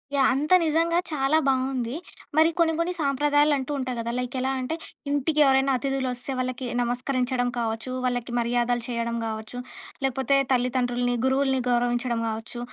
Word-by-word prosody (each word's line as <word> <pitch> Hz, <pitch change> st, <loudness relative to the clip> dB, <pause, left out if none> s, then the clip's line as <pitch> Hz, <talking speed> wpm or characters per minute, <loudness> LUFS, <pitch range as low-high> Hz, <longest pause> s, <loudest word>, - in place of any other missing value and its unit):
Yeah! 270 Hz, -1 st, +4 dB
అంత 295 Hz, +6 st, +1 dB
నిజంగా 330 Hz, +2 st, +2 dB
చాలా 295 Hz, 0 st, +2 dB
బావుంది. 260 Hz, -2 st, 0 dB, 0.4 s
మరి 320 Hz, +1 st, +6 dB
కొన్ని 325 Hz, -1 st, +4 dB
కొన్ని 340 Hz, +2 st, 0 dB
సాంప్రదాయాలు 290 Hz, +1 st, +3 dB
అంటూ 265 Hz, +1 st, -4 dB
ఉంటాయి 255 Hz, -2 st, -3 dB
కదా! 230 Hz, 0 st, -2 dB
లైక్ 250 Hz, 0 st, -3 dB
ఎలా 260 Hz, +1 st, 0 dB
అంటే, 255 Hz, +5 st, -2 dB, 0.3 s
ఇంటికి 290 Hz, +2 st, 0 dB
ఎవరైనా 270 Hz, 0 st, +3 dB
అతిధులొస్తే 260 Hz, -1 st, -2 dB
వాళ్ళకి 255 Hz, 0 st, -3 dB, 0.2 s
నమస్కరించడం 245 Hz, +1 st, 0 dB
కావచ్చు, 225 Hz, +2 st, -2 dB
వాళ్ళకి 245 Hz, -1 st, -1 dB
మర్యాదలు 240 Hz, 0 st, 0 dB
చేయడం 235 Hz, -1 st, -2 dB
కావచ్చు, 220 Hz, +2 st, -5 dB, 0.5 s
లేకపోతే 265 Hz, +1 st, +1 dB
తల్లిదండ్రుల్ని, 245 Hz, -1 st, +1 dB
గురువుల్ని 265 Hz, 0 st, +2 dB
గౌరవించడం 240 Hz, 0 st, +1 dB
కావచ్చు, 225 Hz, +2 st, -5 dB
255 Hz, 140 wpm, -25 LUFS, 245-275 Hz, 0.5 s, మరి